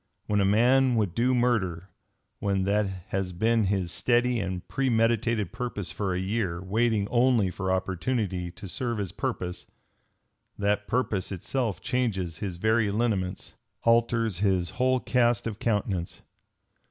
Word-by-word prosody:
When 105 -1 +1
a - - +3
man 125 +5 +4
would 105 -6 +1
do 125 +4 +2
murder, 95 -8 0 0.5
when 100 -1 0
that 100 +1 +1 0.2
has 95 -1 -1
been 110 +4 +2
his 95 -3 0
steady 120 +2 +2
and 95 -2 -4
premeditated 115 -5 +1
purpose 120 -6 -4
for 100 -2 -2
a - - -1
year, 95 -3 -1
waiting 105 +2 +1
only 120 -6 +3
for 95 0 -2
opportunity 95 0 -1
to 95 +3 -10
serve 120 +4 -2
his 100 -4 -3
purpose, 95 -5 -4 0.9
that 105 0 0
purpose 110 -7 -1
itself 105 +1 -2
changes 105 -10 -1
his 95 -2 -4
very 110 +2 +2
lineaments, 100 -4 -1 0.3
alters 115 -4 +2
his 95 -4 +1
whole 130 +1 +2
cast 120 -3 +2
of 110 -2 -4
countenance. 100 -6 -2
105 Hz, 140 wpm, -27 LUFS, 95-120 Hz, 0.9 s, man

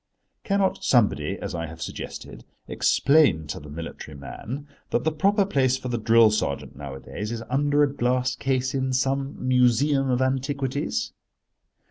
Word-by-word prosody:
Cannot 195 -1 0
somebody, 100 - +2
as - - -6
I 85 -1 -3
have 80 +1 -10
suggested, - - -7 0.2
explain 140 - +3
to 75 - -5
the 75 - -12
military 80 -1 -8
man 130 - -7 0.2
that 120 - 0
the 160 - +1
proper 200 +6 +2
place 130 -8 +2
for 130 - -6
the 120 -1 -1
drill 115 0 +5
sergeant 105 -10 -2
nowadays 70 - -6
is 115 -1 -4
under 145 +2 +3
a 140 -1 +1
glass 125 0 0
case 130 0 -1
in 130 -1 -1
some 135 +2 0
museum 130 +2 +3
of 125 -1 +1
antiquities? 130 - -1
130 Hz, 150 wpm, -25 LUFS, 105-140 Hz, 0.2 s, drill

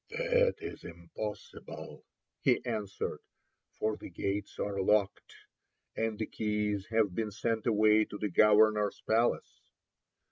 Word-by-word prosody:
"That - - +2
is 410 -1 -8
impossible," 90 +5 -8 0.4
he - - +2
answered, 105 -5 -3 0.6
"for 110 0 -1
the - - -9
gates 100 +3 -3
are 100 -1 -2
locked, 100 0 +1 0.6
and 110 -1 -1
the 110 - -2
keys 105 -2 -2
have 110 -4 +1
been 110 +3 -2
sent 115 +2 -2
away 110 -1 +4
to 105 - -8
the 105 0 -2
governor's 105 +1 +4
palace." 115 +2 +1
105 Hz, 120 wpm, -31 LUFS, 105-110 Hz, 0.6 s, away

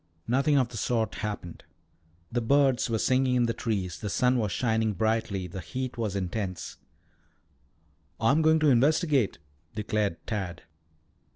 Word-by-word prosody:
Nothing 140 +5 +3
of 130 -3 +2
the 120 - -8
sort 110 -2 0
happened. 105 -5 -5 0.7
The 120 - 0
birds 135 0 +3
were 115 - +1
singing 130 +2 +2
in 120 -1 +3
the 115 - 0
trees, 95 -10 -3
the 105 - -4
sun 125 +4 +2
was 105 -3 -1
shining 110 -3 +1
brightly, 110 -1 -1
the 90 +2 -7
heat 130 +10 -5
was 110 -4 -2
intense. 95 0 -4 1.4
"I'm 135 +8 +3
going 160 0 +5
to 155 - +5
investigate," 140 - +2 0.4
declared 105 -4 -1
Tad. 95 -6 -4
115 Hz, 145 wpm, -28 LUFS, 100-130 Hz, 1.4 s, going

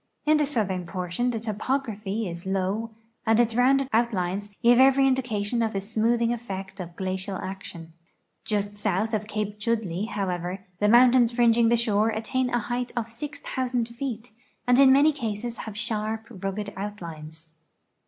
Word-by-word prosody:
In 305 0 +5
the 300 -1 +1
southern 195 -9 -1
portion 180 +7 -2
the 230 -2 -2
topography 220 -2 -2
is 170 +1 -7
low 195 +4 -1 0.3
and 225 -1 +3
its 235 -1 +3
rounded 265 +3 +3
outlines 205 -4 0
give 240 +1 +6
every 270 +1 +6
indication 240 -4 0
of 225 -1 0
the 195 - 0
smoothing 230 +3 +1
effect 195 -4 -6
of 175 -2 -7
glacial 190 0 -3
action. 175 -4 -8 0.5
Just 205 -1 -2
south 210 +2 0
of 210 -1 -1
Cape 210 -1 -3
Chudleigh, 215 -4 -1
however, 185 -1 -3
the 210 - +3
mountains 240 0 +6
fringing 235 -1 +4
the 235 - +4
shore 220 -2 +2
attain 225 +4 -1
a 245 - +1
height 240 +2 -3
of 230 -2 -2
6,000 250 -2 -3
feet, 235 -1 -5 0.3
and 245 +1 +4
in 270 -1 +8
many 285 +3 +6
cases 235 -4 -4
have 210 -1 -7
sharp, 220 0 -2
rugged 200 0 -4
outlines. 165 -6 -7
220 Hz, 155 wpm, -26 LUFS, 195-240 Hz, 0.5 s, in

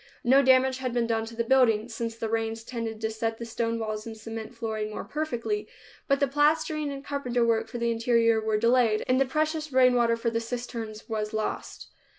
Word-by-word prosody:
No 265 +3 +6
damage 260 0 +4
had 255 -2 -3
been 240 -1 +1
done 225 -1 0
the 230 +1 -3
building, 230 -3 +3
since 230 -1 -4
the 230 -1 -3
rains 225 0 -2
tended 230 -2 -5
to 220 0 -1
set 225 0 -2
the 235 - -6
stone 230 0 -2
walls 215 -1 -4
and 225 -1 -7
cement 225 +2 -7
flooring 220 -2 -3
more 215 - -5
perfectly, 310 - -3 0.4
but 275 -1 +2
the 280 - +3
plastering 300 +1 +1
and 275 0 -7
carpenter 250 -4 0
work 225 -1 +1
for 225 - -6
the 235 0 0
interior 230 -1 +2
were 215 -1 0
delayed, 230 -1 +3
and 255 +1 +3
the - - +4
precious 310 +2 -1
rain 255 -1 +5
water 235 -1 +3
for 230 0 -1
the 230 - 0
cisterns 230 -2 -6
was 215 -1 -3
lost. 215 0 -4
230 Hz, 205 wpm, -27 LUFS, 225-260 Hz, 0.4 s, No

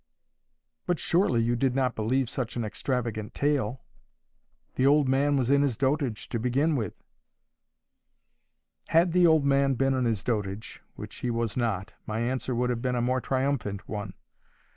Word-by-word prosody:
"But 175 - +1
surely 150 - +2
you 120 +1 +1
did 130 +1 0
not 130 -2 +1
believe 125 +4 0
such 125 -1 -4
an 120 -2 -2
extravagant 110 -1 -3
tale? 135 -4 0 0.9
The 130 - +2
old 145 0 +4
man 140 +2 +2
was 130 0 +1
in 140 0 +5
his 135 -6 0
dotage, 135 -4 -1
to 115 - -2
begin 135 +7 +1
with." 110 -8 -3 1.9
Had 170 +2 +3
the 180 0 +5
old 160 -3 +4
man 140 -1 +3
been 135 +2 +2
in 130 -1 0
his 110 -4 0
dotage, 105 -3 -3
which - - -9
he 125 - -3
was 115 -2 -1
not, 110 -4 -2
my 110 +1 -2
answer 125 +1 -1
would 125 +1 +1
have 120 -1 -3
been 125 0 -1
a - - 0
more 130 +1 +1
triumphant 130 -7 -2
one. 105 -3 -5
125 Hz, 165 wpm, -27 LUFS, 115-140 Hz, 1.9 s, in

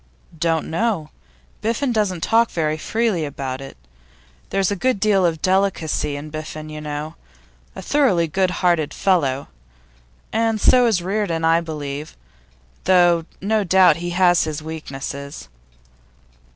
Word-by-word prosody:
'Don't 165 0 0
know. 165 -3 -1 0.5
Biffen 235 +4 0
doesn't 195 -6 0
talk 230 +1 +3
very 155 -2 -1
freely 215 +1 -1
about 135 -2 -5
it; 135 - -10 0.7
there's 195 0 +1
a - - 0
good 255 +2 0
deal 195 -3 +3
of 160 -2 -3
delicacy 185 -6 +1
in 150 +2 -7
Biffen, 155 0 -7
you 155 0 -7
know. 150 +1 -5 0.6
A - - -7
thoroughly 225 - +2
good 185 +4 +1 0.2
hearted 160 -4 +2
fellow. 145 -8 +1 0.9
And 225 0 +1
so 250 +3 +5
is 190 -7 +1
Reardon, 185 -4 -1
I 165 +1 +4
believe, 150 -2 -6 0.7
though 175 -3 +4 0.2
no 215 +2 +1
doubt 185 -3 +5
he 175 +1 -4
has 175 -1 +3
his 155 -1 -4
weaknesses. 140 - -7
170 Hz, 135 wpm, -21 LUFS, 155-195 Hz, 0.9 s, so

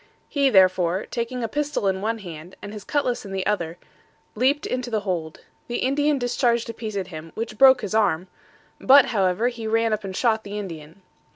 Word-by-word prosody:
He, 280 -2 +2
therefore, 185 -3 +3
taking 240 +1 -3
a - - 0
pistol 290 -3 -2
in 190 0 0
one 225 +2 -1
hand, 175 -3 -10
and 205 - -8
his 210 -2 -8
cutlass 265 -3 -1
in 200 - -9
the 190 -1 -2
other, 170 -5 -1 0.6
leaped 265 +6 +1
into 250 -1 -3
the 220 -2 -1
hold. 170 -5 -4 0.3
The 240 - -4
Indian 290 +3 +1
discharged 245 -1 +1
a - - -14
piece 220 -2 -5
at 190 -1 -3
him, 160 -1 -9
which 220 -1 -5
broke 260 -2 +7
his 205 -3 -4
arm; 195 -5 +1 0.5
but, 275 0 +6
however, 195 +3 +2
he 230 -2 -6
ran 225 0 +2
up 215 0 -2
and 190 -1 -6
shot 220 -1 +1
the 205 +1 -6
Indian. 165 -2 -8
215 Hz, 200 wpm, -23 LUFS, 190-245 Hz, 0.6 s, broke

